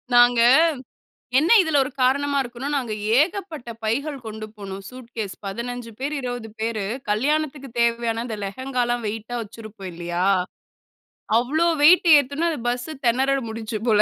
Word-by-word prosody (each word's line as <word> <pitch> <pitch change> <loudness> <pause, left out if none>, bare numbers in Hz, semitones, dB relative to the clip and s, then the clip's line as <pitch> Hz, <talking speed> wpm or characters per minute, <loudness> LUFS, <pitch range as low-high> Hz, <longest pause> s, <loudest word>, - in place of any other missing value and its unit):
நாங்க, 240 -1 +6 1.0
என்ன 315 +4 +2
இதுல 305 -4 +2
ஒரு 275 - -5
காரணமா 280 +2 +2
இருக்குன்னா, 245 +3 -6
நாங்க 245 -5 -2 0.3
ஏகப்பட்ட 320 -8 -2
பைகள் 280 +7 -1
கொண்டு 215 0 -6
போனோம். 195 -1 -7
சூட்கேஸ் 235 -5 -7
15 235 +3 -5
பேர் 290 +3 -2
20 245 -3 -5
பேரு 220 -3 -1 0.3
கல்யாணத்திற்கு 275 +3 0
தேவையான 235 -1 +1
அந்த 220 -3 -4
லெஹெங்காலாம் 245 +1 -2
வெய்ட்டா 225 +3 -5
வெச்சுருபோம் 215 -3 -9
இல்லையா? 175 +1 -3 1.2
அவ்வளோ 310 +8 +1 0.2
வெய்ட் 355 +2 +7
ஏத்துன 285 +5 0
அந்த 300 - -4
பஸ் 245 +2 -3 0.2
திணற 260 +3 +2 0.2
முடிஞ்ச்சு 220 -1 -4
போல. 210 -1 +5
240 Hz, 135 wpm, -23 LUFS, 220-280 Hz, 1.2 s, வெய்ட்